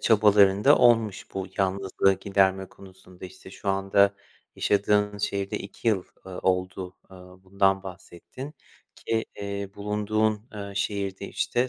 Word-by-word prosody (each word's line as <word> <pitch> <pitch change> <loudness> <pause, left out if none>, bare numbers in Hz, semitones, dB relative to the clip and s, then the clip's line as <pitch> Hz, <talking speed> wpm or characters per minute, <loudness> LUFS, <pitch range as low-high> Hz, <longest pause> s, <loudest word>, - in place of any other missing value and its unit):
çabaların 105 -2 +4
da 145 - +7
olmuş 115 -4 +3
bu 95 -1 -3
yalnızlığı 95 0 +2
giderme 95 -1 +1
konusunda. 95 -1 -15
İşte, 95 0 -12
şu 100 - -7
anda 100 +1 +3 0.4
yaşadığın 105 0 +1
şehirde 100 -1 -2
2 100 +3 -4
yıl, 100 -5 +1 0.2
eee, 95 - -8
oldu, 90 0 -1
eee, 95 - -12
bundan 95 +1 -1
bahsettin 95 - -10 0.4
ki, 115 0 -2 0.2
iii, 100 -1 -5
bulunduğun, 105 +1 -1
eee, 100 -1 -6
şehirde, 100 -1 -3
işte, 125 +1 0
100 Hz, 130 wpm, -26 LUFS, 95-105 Hz, 0.4 s, da